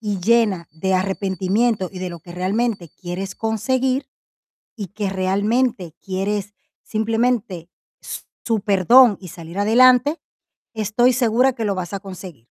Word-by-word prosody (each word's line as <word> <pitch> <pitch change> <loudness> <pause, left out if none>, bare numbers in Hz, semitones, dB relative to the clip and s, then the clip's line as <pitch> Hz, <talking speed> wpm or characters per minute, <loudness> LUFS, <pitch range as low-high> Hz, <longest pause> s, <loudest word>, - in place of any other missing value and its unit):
y 205 -4 -3
llena 210 -5 +2
de 190 +5 -1
arrepentimiento 190 +2 0
y 185 - -8
de 185 -1 -4
lo 170 -2 -9
que 175 - -12
realmente 190 -1 -1
quieres 185 +1 -6
conseguir 255 +5 -1 0.7
y 205 -5 -6
que 200 +1 -4
realmente 195 -1 0
quieres 200 +2 -3 0.3
simplemente 220 -5 -1 0.3
s - - -7 0.2
su 225 -3 0
perdón 215 +3 +5
y 180 - -9
salir 170 +2 -10
adelante, 255 +7 +4 0.6
estoy 225 +4 +2
segura 250 +2 +3
que 225 - -4
lo 200 -2 0
vas 180 -1 -5
a 195 - -4
conseguir. 185 - -10
205 Hz, 140 wpm, -21 LUFS, 185-235 Hz, 0.7 s, perdón